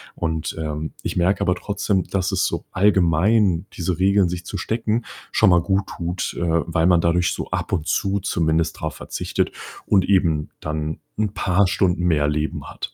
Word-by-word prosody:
und, 80 -1 -2
ähm, 75 0 -4
ich - - -3
merke 90 +3 +2
aber 90 - +2
trotzdem, 100 -1 -1
dass 95 -1 -1
es - - +1
so - - -4
allgemein 95 0 +3
diese 90 0 -2
Regeln 95 -1 +3
sich 90 0 -5
zu 100 - -5
stecken, 115 +3 -1 0.3
schon 105 -4 +4
mal 85 -1 +5
guttut, 90 -1 -2
äh, 85 - 0 0.2
weil 80 0 +1
man 90 -2 +4
dadurch 85 +1 +2
so - - -5
ab - - -2
und 80 -4 0
zu 100 0 +1
zumindest 80 -3 0
drauf 80 -2 -4
verzichtet - - -2 0.3
und 95 -3 +3
eben 85 -6 +2
dann 75 0 -3 0.2
'n 105 -2 -1
paar 95 +1 +2
Stunden 90 -1 +1
mehr 75 -4 +2
Leben 75 +1 -2
hat. - - -7
90 Hz, 175 wpm, -22 LUFS, 80-100 Hz, 0.3 s, mal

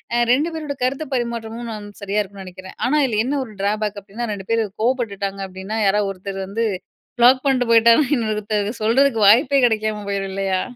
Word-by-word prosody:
அ - - +2 0.2
2 300 +6 +1
பேரோட 300 -3 -4
கருத்து 270 +4 -1
பரிமாற்றமும் 235 -1 -4
நான் 210 -1 -8
சரியா 200 +1 -1
இருக்குன்னு 195 -1 -9
நினைக்கிறேன். 185 +1 -11
ஆனா, 300 +3 +2
இதில 220 -4 0
என்ன 280 +2 -1
ஒரு 220 - -13
டிராபேக் 210 0 -1
அப்பிடின்னா, 215 +5 -6
2 195 -2 -8
பேரு 230 0 +2 0.2
கோவப்பட்டுட்டாங்க 205 -5 -1
அப்பிடின்னா, 190 +4 -6
யாராவது 200 0 +2
ஒருத்தர் 195 +1 -7
வந்து 225 +4 -1 0.5
ப்ளாக் 255 +2 +6
பண்ட்டு 250 -3 +1
போயிட்டாங்கன்னா, 235 +5 +5
இன்னொருத்தர் 215 -2 -1
சொல்றதுக்கு 235 0 +3
வாய்ப்பே 270 +5 +5
கிடைக்காம 215 -2 -2
போயிரும் 195 -1 -2
இல்லயா! 190 -1 -1
220 Hz, 175 wpm, -20 LUFS, 200-240 Hz, 0.5 s, ப்ளாக்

